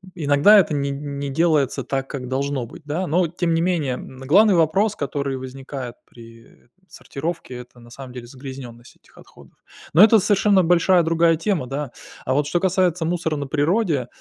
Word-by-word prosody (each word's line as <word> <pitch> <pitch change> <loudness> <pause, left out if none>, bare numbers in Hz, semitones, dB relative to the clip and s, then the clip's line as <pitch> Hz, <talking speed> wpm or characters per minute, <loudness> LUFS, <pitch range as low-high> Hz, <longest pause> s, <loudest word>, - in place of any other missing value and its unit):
иногда 150 +6 +5
это 165 -5 +1
не 140 -1 -1
не 140 0 -5
делается 150 -2 +1
так, 135 -1 -3
как 130 -3 -6
должно 135 0 -2
быть, 115 - -13
да. 165 +6 -2
Но 175 +3 +1
тем 170 0 -2
не 165 - +1
менее, 165 -7 0
м, 130 +1 -9
главный 190 +8 +4
вопрос, 190 +6 +2
который 140 -1 -3
возникает 130 -1 -8
при, 115 -1 -15
э, - - -25
там, 190 0 -36
сортировке- 160 -2 -6
это, 125 0 -13
на 120 0 -16
самом 130 0 -10
деле, 125 -1 -8
загрязненность 125 -2 -11
этих - - -27
отходов. - - -18 0.4
Но 175 +7 +8
это 225 +1 +7
совершенно 200 -1 +3
большая 175 +1 +3
другая 165 0 +2
тема, 165 -5 -2
да. 140 0 -5 0.3
А 130 - 0
вот 145 +1 0
что 175 - 0
касается 180 -2 +1
мусора 165 -2 -1
на 145 - -4
природе, 155 - 0
145 Hz, 185 wpm, -21 LUFS, 135-175 Hz, 0.4 s, Но